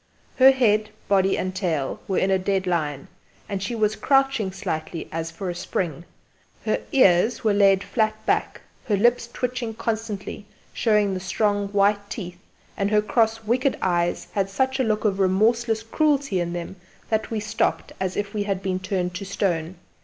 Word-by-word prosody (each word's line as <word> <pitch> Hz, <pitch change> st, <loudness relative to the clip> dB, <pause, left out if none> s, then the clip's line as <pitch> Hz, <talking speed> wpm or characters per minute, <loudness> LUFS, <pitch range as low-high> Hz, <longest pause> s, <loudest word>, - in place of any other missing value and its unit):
Her 265 Hz, 0 st, +8 dB
head, 215 Hz, -5 st, +3 dB, 0.2 s
body 195 Hz, -1 st, +3 dB
and 185 Hz, 0 st, -2 dB
tail 165 Hz, -8 st, -1 dB
were 190 Hz, -, 0 dB
in 195 Hz, -, +2 dB
a 190 Hz, -, +3 dB
dead 190 Hz, 0 st, 0 dB
line, 150 Hz, -6 st, -1 dB, 0.4 s
and 195 Hz, -1 st, -3 dB
she 215 Hz, +5 st, -3 dB
was 215 Hz, -1 st, +1 dB
crouching 270 Hz, -7 st, +2 dB
slightly 170 Hz, -4 st, -4 dB
as 165 Hz, 0 st, -3 dB
for 165 Hz, +4 st, -6 dB
a 175 Hz, -, -2 dB
spring; 170 Hz, -2 st, -3 dB, 0.6 s
her -, -, 0 dB
ears 220 Hz, -, +4 dB
were 215 Hz, -2 st, +3 dB
laid 195 Hz, -1 st, +4 dB
flat 215 Hz, -2 st, 0 dB
back, -, -, 0 dB, 0.3 s
her 205 Hz, -3 st, +2 dB
lips 235 Hz, +2 st, +2 dB
twitching 240 Hz, -3 st, -3 dB
constantly, 220 Hz, -2 st, -4 dB, 0.3 s
showing 210 Hz, -3 st, +2 dB
the 185 Hz, -, -2 dB
strong 205 Hz, +2 st, 0 dB
white 205 Hz, 0 st, +1 dB
teeth, 180 Hz, -4 st, -6 dB, 0.4 s
and 200 Hz, -1 st, 0 dB
her 210 Hz, 0 st, +3 dB
cross 225 Hz, 0 st, +1 dB
wicked 250 Hz, +5 st, +1 dB
eyes 175 Hz, -2 st, 0 dB
had 195 Hz, -1 st, -1 dB
such 265 Hz, +6 st, 0 dB
a -, -, +3 dB
look 215 Hz, -2 st, 0 dB
of 200 Hz, -2 st, +1 dB
remorseless 220 Hz, +4 st, +2 dB
cruelty 280 Hz, -, +1 dB
in 175 Hz, 0 st, -2 dB
them 175 Hz, +2 st, -6 dB, 0.3 s
that 220 Hz, -1 st, 0 dB
we 225 Hz, -, -2 dB
stopped 210 Hz, +1 st, -1 dB
as 185 Hz, -1 st, -2 dB
if 205 Hz, -1 st, -3 dB
we 210 Hz, -, -1 dB
had 195 Hz, -2 st, -2 dB
been 185 Hz, -1 st, -1 dB
turned 185 Hz, -1 st, -2 dB
to 185 Hz, -, -5 dB
stone. 185 Hz, -3 st, -1 dB
200 Hz, 175 wpm, -24 LUFS, 185-225 Hz, 0.6 s, Her